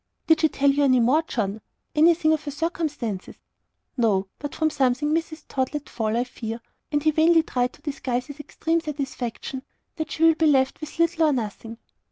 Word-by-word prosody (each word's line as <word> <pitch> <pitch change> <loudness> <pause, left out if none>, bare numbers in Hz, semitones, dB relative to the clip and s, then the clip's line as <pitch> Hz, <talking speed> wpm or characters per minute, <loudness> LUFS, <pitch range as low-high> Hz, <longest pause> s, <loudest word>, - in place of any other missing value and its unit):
"Did 320 0 +4
she 315 - +4
tell 280 -1 +3
you 285 +1 +1
any 255 -2 +4
more, 255 +7 +4
John? 220 -8 -3 0.3
Anything 315 0 +4
of 310 -1 -1
her - - -3
circumstances?" 290 - -3 0.6
"No. 210 -5 +2
But 290 -1 -6
from 315 -1 +1
something 285 +1 +1
Mrs. 320 -1 -2
Tod 260 +2 -2
let 295 - -4
fall, 220 -1 -1
I 240 - +2
fear" 230 -2 -6 0.3
and 295 -1 0
he 310 - +4
vainly 325 +1 +4
tried 250 -5 -1
to - - -20
disguise 255 -4 -2
his 285 +2 -10
extreme 325 +3 -1
satisfaction 270 -4 -5 0.4
"that 315 -1 -3
she 315 - -2
will 325 0 +7
be 320 0 +2
left 265 -1 +2
with 310 +1 -8
little 335 0 +3
or 300 - +3
nothing." 225 -1 -4
290 Hz, 195 wpm, -24 LUFS, 245-315 Hz, 0.6 s, will